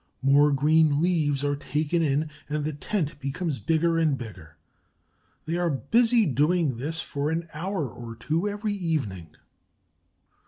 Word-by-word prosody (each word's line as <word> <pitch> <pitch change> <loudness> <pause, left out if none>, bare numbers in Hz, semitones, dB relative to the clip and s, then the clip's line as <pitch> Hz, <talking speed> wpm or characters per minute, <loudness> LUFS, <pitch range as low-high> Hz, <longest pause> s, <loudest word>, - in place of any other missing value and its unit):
More 145 +2 +5
green 150 +1 +3
leaves 155 -5 +1
are 145 0 +1
taken 150 +3 -1
in, 150 0 0 0.2
and 150 0 -1
the 155 - -2
tent 150 -1 -3
becomes 145 +2 -3
bigger 165 +1 +1
and 155 -4 +2
bigger. 95 -10 -10 0.9
They 165 +2 -1
are 175 -1 +1
busy 225 - +3
doing 150 -1 +1
this 155 +6 -3
for 145 -1 -2
an 165 +1 -2
hour 170 0 -2
or 115 0 -9
two 160 - -1
every 205 +1 -2
evening. 130 - -3
150 Hz, 145 wpm, -26 LUFS, 140-170 Hz, 0.9 s, More